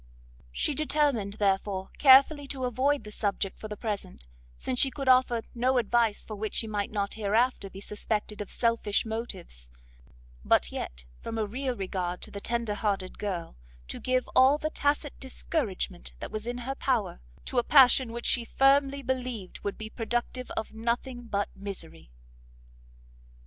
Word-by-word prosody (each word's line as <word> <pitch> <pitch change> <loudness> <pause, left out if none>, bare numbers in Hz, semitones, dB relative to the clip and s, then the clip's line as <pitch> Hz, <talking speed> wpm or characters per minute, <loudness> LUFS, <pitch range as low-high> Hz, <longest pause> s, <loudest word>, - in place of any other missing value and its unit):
She 175 - 0
determined, 285 -8 +1
therefore, 195 -2 0
carefully 280 +1 +7
to 265 -2 -3
avoid 265 +4 +1
the 210 - -9
subject 200 -2 -2
for 215 - -6
the 210 -1 -6
present, 200 - -4 0.3
since 250 - -2
she 270 - +4
could 275 0 -6
offer 255 -3 +4
no 255 +2 +2
advice 230 -2 +2
for 215 - -6
which 215 +1 -4
she - - +1
might 210 -2 -2
not, 200 -2 -2
hereafter, 220 0 +1
be 195 +1 -10
suspected 210 0 -3
of 205 - -6
selfish 230 -3 +1
motives; 190 - -6 0.7
but - - +3
yet, - - -5 0.2
from 225 - -5
a 220 - +1
real 255 +4 -3
regard 185 -3 -3
to - - -7
the 200 - -6
tender 235 -2 -1
hearted 200 -3 -2
girl, 185 - -4 0.3
to - - -5
give 255 0 0
all 265 +3 +7
the 310 +1 -3
tacit 290 0 0
discouragement 225 - -3
that - - -6
was 215 +1 -5
in 245 0 -2
her 250 +2 -3
power, 240 - -1 0.2
to 255 - +1
a - - +1
passion 260 -2 +6
which 235 +1 -5
she 240 - +3
firmly 275 +2 +3
believed 250 -6 -3
would 200 - -4
be 220 - -6
productive 240 +3 -3
of 220 - -3
nothing 240 +2 -2
but 200 -2 0
misery. 85 - -7
225 Hz, 165 wpm, -28 LUFS, 200-255 Hz, 0.7 s, carefully